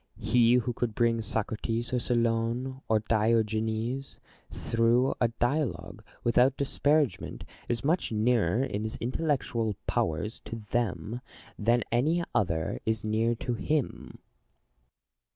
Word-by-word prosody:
He 115 +2 +4
who 125 0 +1
could 115 -2 -2
bring 115 -1 +2
Socrates, 115 +2 -2
or 125 - +2
Solon, 120 +2 0
or 110 -1 +3
Diogenes 110 +3 0 0.3
through 115 +3 +2
a 120 - +5
dialogue, 120 +5 -2 0.2
without 125 +3 +3
disparagement, 140 - 0 0.3
is 120 0 -1
much 160 +1 +1
nearer 110 -1 +2
in 105 -6 -2
his 110 0 -4
intellectual 120 -5 -1
powers 80 +8 -1
to - - -5
them, 115 +1 -2 0.4
than 115 +3 +3
any 155 +9 +2
other 80 -6 0
is 110 -1 -1
near 110 +2 +1
to 125 +1 -3
him. 145 +4 -2
115 Hz, 115 wpm, -29 LUFS, 110-125 Hz, 0.4 s, a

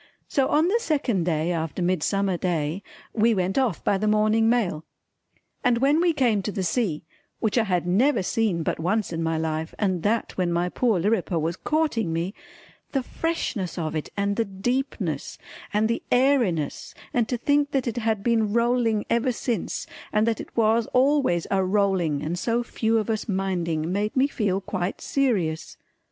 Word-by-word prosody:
So 270 -3 +1
on 310 +3 +3
the 445 +6 +2
second 275 - 0
day 165 0 0
after 165 +1 -2
Midsummer 185 +2 +1
Day 170 -1 -1 0.3
we 225 0 +3
went 185 0 0
off 240 -10 0
by 195 - +1
the 215 - 0
morning 215 +1 +3
mail. 195 -10 +1 0.8
And 245 -2 +3
when 280 +6 +3
we 350 -1 +4
came 240 -9 +2
to 210 - -3
the 195 -2 -3
sea 180 -4 -1 0.4
which 220 -3 0
I 235 -3 +3
had 180 -4 0
never 210 +7 +2
seen 200 -5 0
but - - -2
once 195 +3 0
in 165 - -2
my 165 0 0
life 160 0 -3
and 185 -5 0
that 220 +6 0
when 175 -2 +1
my 175 +1 0
poor 225 -2 +1
Lirriper 205 -1 0
was 165 +2 -1
courting 300 - 0
me, 170 +4 -2 0.6
the 270 -2 +1
freshness 245 - -3
of 160 -2 -2
it 155 - -3
and 200 0 0
the 230 - +1
deepness 195 - -3 0.3
and 210 +1 +2
the 230 - -1
airiness 245 - +1 0.2
and 240 -2 +1
to 245 - 0
think 285 +3 +2
that 270 -3 0
it 235 -1 -3
had 220 -3 0
been 225 -3 +1
rolling 235 -2 +2
ever 235 +2 +1
since 240 0 -3 0.3
and 215 +1 +2
that 230 -2 0
it - - -13
was 225 0 +3
always 255 - +3
a 195 -1 +2
rolling 185 -6 +1
and 170 +3 -2
so 235 +4 0
few 225 -1 0
of 215 - -1
us 220 0 -3
minding, 175 -4 -1
made 205 +3 -1
me 260 +1 +4
feel 205 -8 -1
quite 185 -1 -3
serious. 190 - -1
210 Hz, 180 wpm, -25 LUFS, 175-235 Hz, 0.8 s, we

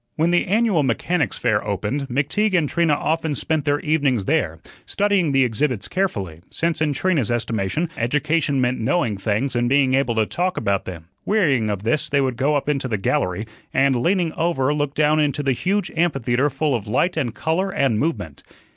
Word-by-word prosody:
When 165 +2 +1
the 175 - +2
annual 210 -4 +2
Mechanic's 145 +4 0
Fair 110 -4 +1
opened, 105 +7 -2
McTeague 170 - +1
and 155 -4 +1
Trina 165 -1 +2
often 160 0 -1
spent 155 +1 -1
their 145 -1 +1
evenings 140 -9 +1
there, - - 0 0.3
studying 200 -6 +1
the 135 -1 +4
exhibits 120 -2 -1
carefully 100 - -2
(since 165 -1 -1
in 155 -2 +2
Trina's 145 - 0
estimation 115 - -1
education 145 +3 0
meant 125 0 0
knowing 120 -2 0
things 110 +6 -1
and 120 0 +1
being 135 -1 +3
able 130 -3 +1
to 110 -1 +2
talk 180 +9 -2
about 100 -1 0
them). 85 -2 -9
Wearying 145 - +2
of 100 -1 -3
this 115 +7 0
they 140 - +2
would 130 -2 0
go 140 +5 +1
up 145 - -1
into 140 -3 0
the 110 -4 -1
gallery, 95 +1 -1 0.3
and, 135 0 +3
leaning 170 +5 +1
over, 150 -5 0
look 145 -1 -2
down 155 0 +3
into 145 -1 0
the 135 -1 +2
huge 195 - -1
amphitheatre 135 -5 +1
full 145 +2 -1
of 115 -4 -3
light 170 - +1
and 125 -8 -2
color 175 +5 -1
and 135 - +1
movement. 100 - -3
140 Hz, 190 wpm, -21 LUFS, 120-160 Hz, 0.3 s, the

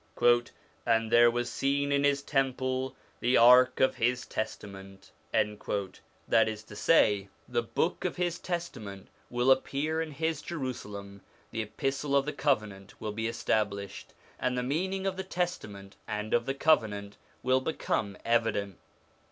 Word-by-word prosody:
' - - -21 0.3
And 115 -1 +2
there 120 0 +7
was 120 +1 -1
seen 140 +1 0
in 140 0 +2
His 140 -1 +2
temple 130 -2 -1 0.2
the 125 +1 +3
ark 125 +2 +7
of 130 - +3
His 125 +2 +1
Testament.' 95 -3 -6 0.2
That 105 +2 -1
is 110 0 -6
to 105 - -12
say, 105 -9 +3 0.2
the - - 0
Book - - -1
of - - -1
His 175 -1 -1
Testament 120 - -5 0.2
will 120 +2 +2
appear 145 +4 +1
in 160 - -3
His 160 +1 -2
Jerusalem, 105 -10 -6 0.3
the 110 - -2
Epistle 135 +6 -2
of 140 -1 +3
the 150 - -3
Covenant 105 -8 -1
l - - -27
will 110 - -3
be 110 +2 -2
established, 105 -4 -2 0.2
and 125 0 0
the 125 - 0
meaning 190 +8 -1
of 190 -1 -1
the 190 - -3
Testament 135 - -4
and 105 0 -3
of 120 0 +2
the 135 - -1
Covenant 105 -10 +1 0.3
will 130 +1 +3
become 110 -8 -2
evident. 110 -5 0
120 Hz, 150 wpm, -29 LUFS, 105-140 Hz, 0.3 s, there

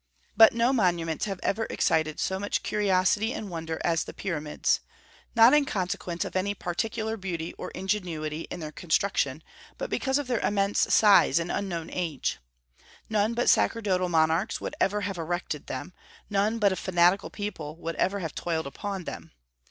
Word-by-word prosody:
But 225 +1 +8
no 235 +3 +2
monuments 170 - +1
have 195 -3 -4
ever 225 +2 0
excited 155 -1 +1
so 190 0 -1
much 205 +1 -2
curiosity 205 +2 +2
and 205 -3 -6
wonder 165 -1 -4
as 165 -2 +1
the - - -10
Pyramids, 155 -6 -1 0.6
not 230 +3 +8
in 295 -1 +5
consequence 185 -6 -2
of - - -7
any 200 +2 0
particular 220 +5 -2
beauty 175 -4 -4
or - - -7
ingenuity 165 -6 -3
in 175 - -6
their 155 -1 -5
construction, 160 -3 0 0.3
but - - -5
because 265 0 +1
of 290 - -2
their 245 -3 0
immense 200 0 +1
size 205 -5 +6
and 170 +1 -1
unknown 175 -5 -3
age. 165 -7 -2 0.7
None 215 +2 +1
but 240 - 0
sacerdotal 190 -5 +2
monarchs 165 +5 +2
would - - -5
ever 205 +1 +2
have 195 -3 -3
erected 165 -2 -3
them; 130 +7 -6 0.4
none 205 +3 +1
but 205 -3 +3
a - - 0
fanatical 180 +1 +2
people 165 -8 -5
would 165 0 -5
ever 200 +1 0
have 160 -3 -4
toiled 160 -2 -2
upon 190 +7 -5
them. - - -8
185 Hz, 165 wpm, -27 LUFS, 165-210 Hz, 0.7 s, But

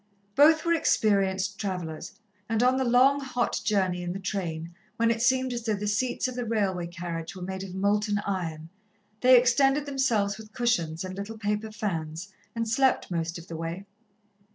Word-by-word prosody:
Both 315 +6 +5
were 335 - +3
experienced 200 - +1
travellers, 180 -4 -4 0.4
and 225 +1 +1
on 255 +1 +4
the 265 - +1
long, 260 +3 +4
hot 250 -3 -1
journey 185 -4 +1
in 175 0 -3
the 195 - -5
train, 170 -4 -4 0.2
when 230 0 +3
it 230 -1 -1
seemed 260 +1 +2
as 235 -1 -4
though 220 -2 0
the 205 +1 -4
seats 240 +6 0
of 255 - -5
the 245 0 -3
railway 200 -6 -1
carriage 170 0 -6
were 185 - -7
made 190 +1 -4
of 190 -1 -8
molten 205 +2 +1
iron, 165 -5 -3 0.5
they 255 +1 +7
extended 270 +4 +3
themselves 235 -8 0
with 215 0 -12
cushions 170 -10 0
and 185 0 -6
little 200 +3 -6
paper 210 +1 -2
fans, 180 -3 -4 0.2
and 230 0 -1
slept 260 -2 +2
most 170 0 -2
of 170 +1 -11
the 165 - -7
way. 165 +4 -5
205 Hz, 180 wpm, -27 LUFS, 180-240 Hz, 0.5 s, they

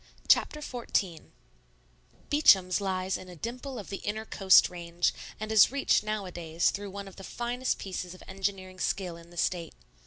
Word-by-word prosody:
Chapter 300 - +3
XIV 210 - -2 1.0
Beacham's 195 - +5
lies 190 -1 -1
in 185 - -11
a 180 - -10
dimple 250 - -6
of 205 - -8
the 195 - -4
inner 215 +2 -4
coast 190 -3 +6
range, 175 -1 -1 0.3
and 215 +1 -4
is 220 +1 +7
reached 280 -5 +2
nowadays 180 -6 -1
through 205 0 -5
one 200 +1 -7
of 195 - -13
the 195 - -9
finest 245 +4 -2
pieces 185 -2 -5
of - - -14
engineering 190 -1 -4
skill 185 -3 -1
in 170 0 -14
the 175 - -15
State. 170 -2 -1
195 Hz, 165 wpm, -29 LUFS, 180-215 Hz, 1.0 s, is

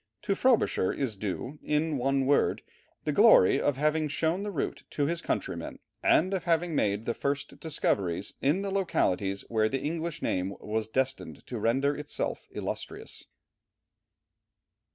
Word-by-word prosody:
To 205 -1 +1
Frobisher 230 - +2
is 130 -6 -2
due, 105 +9 -4
in 150 +1 0
one 135 +1 +1
word, 140 +1 +2 0.4
the - - 0
glory 90 - +6
of 145 -2 +1
having 155 +2 +1
shown 160 +5 0
the 205 - -3
route 175 -8 -3
to 145 - 0
his 170 +3 -1
countrymen, - - -3 0.2
and 185 +4 +3
of 185 -3 -2
having 170 0 +1
made 105 -5 +1
the 120 - 0
first 140 +2 -3
discoveries 100 - 0
in 155 +8 +2
the 200 - -2
localities 100 - 0
where 110 -1 +2
the 135 +2 -2
English 165 +1 -3
name 95 +2 -1
was 110 +1 -2
destined 130 +4 -2
to 120 - -5
render 135 +6 +2
itself 150 0 -4
illustrious. - - -5
140 Hz, 150 wpm, -29 LUFS, 110-165 Hz, 0.4 s, glory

